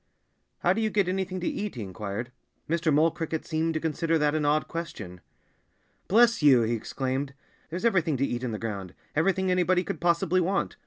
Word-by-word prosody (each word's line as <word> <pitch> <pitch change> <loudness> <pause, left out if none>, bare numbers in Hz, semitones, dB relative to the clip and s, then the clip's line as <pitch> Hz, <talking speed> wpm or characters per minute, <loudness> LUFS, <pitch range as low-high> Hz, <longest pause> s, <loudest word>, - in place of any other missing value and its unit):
"How - - +4
do 225 - -1
you 220 - +1
get 200 -3 +1
anything 185 0 -2
to 180 - -2
eat?" 205 -4 -3
he 115 - -4
inquired. 100 +5 -5 0.4
Mr. 165 0 +1
Mole 155 +3 +4
Cricket 160 -1 -4
seemed 160 0 -1
to - - +1
consider 165 +1 0
that 150 -1 +2
an 155 -1 0
odd 150 +1 +2
question. 110 - -6 0.9
"Bless 235 +1 +4
you!" 135 -5 +6
he 115 +1 0
exclaimed. 135 +4 -3 0.3
"There's 175 +7 -4
everything 165 - +2
to 135 - +1
eat 120 -2 -3
in 125 - -2
the 110 - -3
ground 100 -5 -5 0.2
everything 190 +4 +2
anybody 180 0 +2
could - - -5
possibly 175 +1 +2
want. 190 +3 0
160 Hz, 195 wpm, -27 LUFS, 130-180 Hz, 0.9 s, you